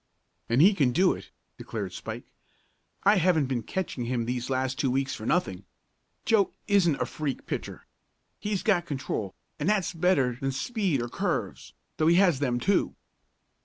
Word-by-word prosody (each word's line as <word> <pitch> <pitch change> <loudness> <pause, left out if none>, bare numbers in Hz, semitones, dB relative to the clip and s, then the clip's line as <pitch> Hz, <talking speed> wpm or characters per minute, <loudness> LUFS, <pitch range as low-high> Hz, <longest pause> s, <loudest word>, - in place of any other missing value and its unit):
"And 120 +6 +5
he 200 +4 +7
can 140 -10 +2
do 180 +5 +4
it!" - - -10 0.3
declared - - -5
Spike. - - -6 0.8
"I 205 +1 +5
haven't 170 -4 +3
been 130 -2 -2
catching 140 - -3
him 120 -1 -1
these 125 +1 -3
last 130 +1 -1
two 135 - +1
weeks 135 +1 0
for 110 -2 -6
nothing. 100 - 0 0.6
Joe 215 -3 +3
isn't 180 -8 +3
a - - +1
freak 145 -4 -4
pitcher. - - -5 0.5
He's 205 -2 -2
got 185 -6 +2
control, 130 -8 -3 0.2
and 150 +6 0
that's 205 -4 +1
better 150 -8 +1
than 135 0 -1
speed 185 - -1
or - - -3
curves, - - -3 0.2
though 155 - +2
he 170 - +5
has 175 -7 +4
them, 125 -4 0
too." 195 +9 +1
145 Hz, 165 wpm, -27 LUFS, 125-185 Hz, 0.8 s, he